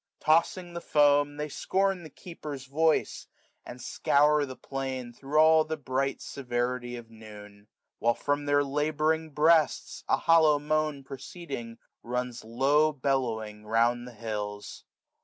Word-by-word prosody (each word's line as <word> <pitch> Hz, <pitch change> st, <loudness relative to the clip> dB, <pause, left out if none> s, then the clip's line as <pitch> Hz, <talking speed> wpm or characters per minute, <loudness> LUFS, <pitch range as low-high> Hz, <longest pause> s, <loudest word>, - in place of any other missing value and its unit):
Tossing 170 Hz, +3 st, +1 dB
the 170 Hz, -, -5 dB
foam. 145 Hz, -2 st, +3 dB
They 150 Hz, 0 st, -3 dB
scorn 190 Hz, +5 st, 0 dB
the 160 Hz, -, -10 dB
keeper's 150 Hz, -4 st, -9 dB
voice, 155 Hz, +4 st, 0 dB, 0.4 s
and 125 Hz, -, -10 dB
scour 145 Hz, +3 st, +2 dB
the 130 Hz, -, -8 dB
plain. 130 Hz, -1 st, -5 dB
Thro' 140 Hz, +5 st, -1 dB
all 160 Hz, 0 st, +6 dB
the 155 Hz, 0 st, -4 dB
bright 135 Hz, -1 st, -2 dB
severity 120 Hz, -1 st, -3 dB
of 115 Hz, -1 st, -10 dB
noon; 105 Hz, -2 st, -13 dB, 0.3 s
While, 120 Hz, 0 st, +2 dB
from 145 Hz, 0 st, -1 dB
their 145 Hz, 0 st, +3 dB
labouring 155 Hz, +3 st, 0 dB
breasts, 155 Hz, 0 st, +2 dB
a -, -, +4 dB
hollow 160 Hz, -2 st, +5 dB
moan 150 Hz, -1 st, -1 dB
Proceeding, 135 Hz, -4 st, -8 dB, 0.2 s
runs 125 Hz, 0 st, -4 dB
low^bellowing 130 Hz, -4 st, 0 dB
round 120 Hz, +2 st, +1 dB
the 125 Hz, -, -10 dB
hills. 105 Hz, -2 st, -6 dB
140 Hz, 130 wpm, -28 LUFS, 120-155 Hz, 0.4 s, all